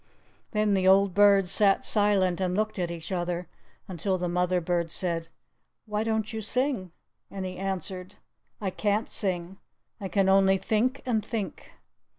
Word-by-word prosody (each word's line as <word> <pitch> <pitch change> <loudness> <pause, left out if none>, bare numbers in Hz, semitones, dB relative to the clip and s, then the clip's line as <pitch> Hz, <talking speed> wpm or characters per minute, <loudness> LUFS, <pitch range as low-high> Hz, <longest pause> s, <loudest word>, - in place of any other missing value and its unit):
Then 210 -2 +1
the 190 -1 +2
old 195 0 +5
birds 200 -2 +5
sat 200 -1 +3
silent 195 -4 +2
and 180 -1 0
looked 215 -1 -1
at 175 -1 -1
each 170 +1 -7
other, 175 -1 -2 0.4
until 185 +1 -1
the 180 0 -2
mother 180 +1 +1
bird 170 -1 -1
said, 170 -2 -1 0.6
"Why 210 0 -1
don't 220 0 -1
you 220 - -3
sing?" 245 - -1 0.4
And 190 -1 -5
he 185 0 -6
answered, 190 0 -4 0.4
"I 195 -3 -2
can't 210 +3 0
sing 185 -1 -3 0.4
I 200 - -4
can 190 +1 +1
only 195 0 +5
think 235 +7 0
and 225 -4 0
think." 220 -4 -5
195 Hz, 160 wpm, -27 LUFS, 180-210 Hz, 0.6 s, old